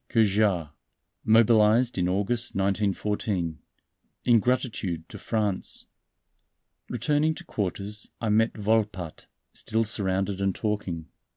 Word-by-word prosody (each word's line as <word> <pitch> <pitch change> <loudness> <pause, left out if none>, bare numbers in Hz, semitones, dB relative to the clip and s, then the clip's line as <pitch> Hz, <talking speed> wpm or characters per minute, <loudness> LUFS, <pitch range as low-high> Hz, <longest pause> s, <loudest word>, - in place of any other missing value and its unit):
Cajard, 100 -7 +2 0.5
mobilized 115 +2 +4
in 90 -1 0
August, 105 +5 0
1914, 95 -3 -1 0.7
in 120 -2 +6
gratitude 105 -9 -1
to - - -9
France." 105 -4 -1 1.0
Returning 150 +2 +1
to - - -9
quarters 100 +1 -3
I 115 - -1
met 110 +2 +2
Volpatte, 105 -6 -1 0.3
still 110 +1 -1
surrounded 95 -2 -1
and 95 -1 +1
talking. 95 -7 -3
105 Hz, 100 wpm, -26 LUFS, 95-115 Hz, 1.0 s, in